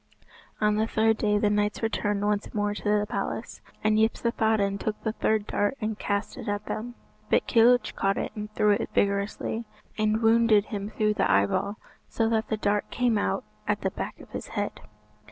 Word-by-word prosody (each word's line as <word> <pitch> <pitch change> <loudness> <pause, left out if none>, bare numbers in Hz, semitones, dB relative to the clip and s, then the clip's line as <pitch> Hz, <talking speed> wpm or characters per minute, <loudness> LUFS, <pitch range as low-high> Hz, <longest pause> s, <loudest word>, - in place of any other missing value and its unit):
On 210 0 +2
the 220 +1 +1
third 220 0 +2
day 210 -1 +2
the 205 0 +2
knights 210 +1 0
returned 205 -2 0
once 210 0 0
more 205 0 0
to 205 - -8 0.2
the 205 - -1
palace, - - -4 0.2
and 215 0 +3
Yspathaden 220 -3 +1
took 215 +1 -3
the 220 - 0
third 215 -1 0
dart 205 +6 0
and 215 -1 -3
cast 200 0 -2
it - - -7
at 205 0 -2
them. 240 +2 -5 0.3
But - - +3
Kilhuch 245 +1 +4
caught 195 0 +1
it - - -2
and 210 0 -6
threw 210 - +4
it 205 - 0
vigorously, 200 +3 0 0.4
and 215 +1 +1
wounded 225 -2 +5
him 205 -2 -4
through 215 -1 +1
the 205 - +1
eyeball, 100 - +2 0.3
so 225 - 0
that 225 -1 0
the 220 - 0
dart 205 0 0
came 240 -3 +1
out 95 - -1 0.2
at - - 0
the - - -1
back - - -6
of - - -14
his - - -6
head. - - -4
210 Hz, 190 wpm, -27 LUFS, 205-220 Hz, 0.4 s, wounded